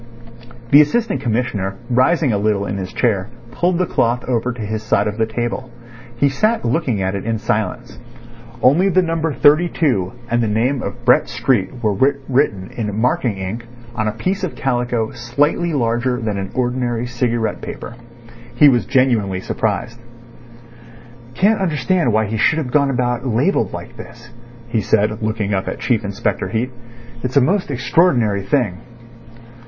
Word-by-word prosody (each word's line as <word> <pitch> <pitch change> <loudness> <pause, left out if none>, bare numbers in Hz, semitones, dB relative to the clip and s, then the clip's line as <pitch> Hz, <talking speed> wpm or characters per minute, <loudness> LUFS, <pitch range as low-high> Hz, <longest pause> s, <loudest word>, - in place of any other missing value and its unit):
The 145 - +9
Assistant 230 +10 0
Commissioner, 110 -5 -1
rising 130 +2 +2
a 100 - +1
little 105 -1 0
in 100 - -3
his 95 -1 -5
chair, 110 -4 0 0.2
pulled 175 +6 0
the 185 - +1
cloth 120 -5 0
over 125 0 0
to 120 -1 -8
his 110 +1 -3
side 105 -2 +1
of 105 +1 -4
the 110 - +2
table. 120 +3 -3 0.5
He 140 +4 +2
sat 215 - 0
looking 120 - 0
at 95 +1 -1
it 100 - -4
in 115 0 -1
silence. 110 0 -3 0.6
Only 170 +10 +5
the 185 0 +3
number 165 -1 -1
32 145 - +2 0.2
and 120 0 +1
the 115 - +1
name 120 +5 0
of 120 +1 -7
Brett 125 +1 +4
Street 125 0 -1
were 105 -1 +2
written 135 -4 0
in 105 -2 -3
marking 120 -3 0
ink 105 +5 -5 0.3
on 110 -2 -1
a - - +1
piece 185 - -2
of 185 - -3
calico 120 -3 -1
slightly 140 +7 0
larger 125 -2 0
than 110 -4 -2
an 95 0 -4
ordinary 125 -2 -1
cigarette 120 -2 -1
paper. 115 - -7 0.6
He 150 - +7
was 120 -3 +1
genuinely 115 -8 +2
surprised. 115 +3 -2 1.4
"Can't 210 +2 +3
understand 170 -4 +1
why 110 +1 +2
he 110 +2 -3
should 155 +8 +3
have 140 -6 -3
gone 140 0 +3
about 125 0 -1
labelled 115 -1 +1
like - - -8
this," - - -12 0.4
he 115 -2 0
said, 105 +1 +1
looking 110 -2 -1
up 95 -1 -1
at - - -3
Chief 115 -4 0
Inspector 100 -1 -2
Heat. 120 +3 -2 0.5
"It's 125 +2 -1
a - - +7
most 180 +8 +1
extraordinary 120 - +2
thing." 100 -4 0
120 Hz, 165 wpm, -19 LUFS, 110-140 Hz, 1.4 s, The